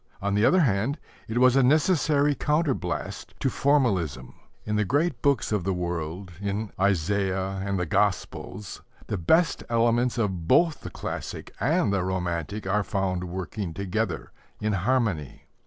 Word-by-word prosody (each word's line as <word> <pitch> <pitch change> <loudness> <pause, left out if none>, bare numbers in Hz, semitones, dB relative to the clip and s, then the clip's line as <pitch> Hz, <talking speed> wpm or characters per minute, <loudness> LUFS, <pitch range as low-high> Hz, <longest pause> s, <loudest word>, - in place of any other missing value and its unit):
On 100 0 -1
the 105 +1 +2
other 185 0 +5
hand, 120 +2 +1 0.3
it 110 - -3
was 130 0 +5
a 135 - +5
necessary 150 +1 +3
counterblast 145 - -2
to 135 - 0
formalism. 100 - +1 0.3
In 105 - -1
the 105 - +2
great 145 - 0
books 140 -7 +2
of 105 -4 0
the 95 0 0
world, 90 +1 -4
in 100 +1 -2
Isaiah 95 0 0
and 100 0 -1
the 90 - 0
Gospels, 100 +4 -2 0.2
the 100 - -3
best 165 - +2
elements 120 +1 +2
of 95 -7 -1
both 165 - +4
the - - -6
classic - - -6
and 100 - +2
the 95 -2 +1
romantic 90 +1 -2
are 100 +2 +1
found 95 -3 -1
working 90 0 -5
together 100 0 -2 0.3
in 105 0 0
harmony. 100 - 0
100 Hz, 150 wpm, -26 LUFS, 95-125 Hz, 0.3 s, other